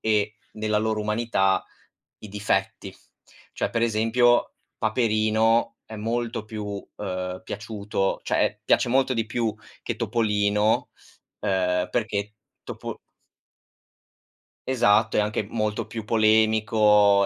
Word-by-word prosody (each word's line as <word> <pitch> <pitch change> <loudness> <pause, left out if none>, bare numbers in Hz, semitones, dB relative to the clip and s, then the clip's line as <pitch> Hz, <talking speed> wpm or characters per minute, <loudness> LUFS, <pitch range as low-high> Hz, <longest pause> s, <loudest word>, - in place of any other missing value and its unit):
e 105 -1 +1 0.2
nella 110 -1 0
loro 110 0 0
umanità 105 -3 +1 0.5
i 105 - -10
difetti. 105 +1 -2 0.6
Cioè - - -2
per 115 -1 0
esempio, 115 +2 +3 0.2
Paperino 110 0 +2
è 110 - -9
molto 115 +1 -2
più, 110 -1 -6 0.3
uhm, 90 -2 -4
piaciuto, 105 -1 -3
cioè - - +1
e - - -3
piace - - +3
molto 130 +1 +2
di 115 -1 -1
più 115 -1 -1 0.3
che - - -3
Topolino, 105 -1 +1 0.5
uhm, 90 -2 0
perché 105 -2 -2 0.3
Topo - - -7 1.7
Esatto, 110 -4 +3
è - - +5
anche 105 0 0
molto 110 -2 -2
più 110 -2 -6
polemico 110 -2 +4
110 Hz, 110 wpm, -25 LUFS, 105-115 Hz, 1.7 s, è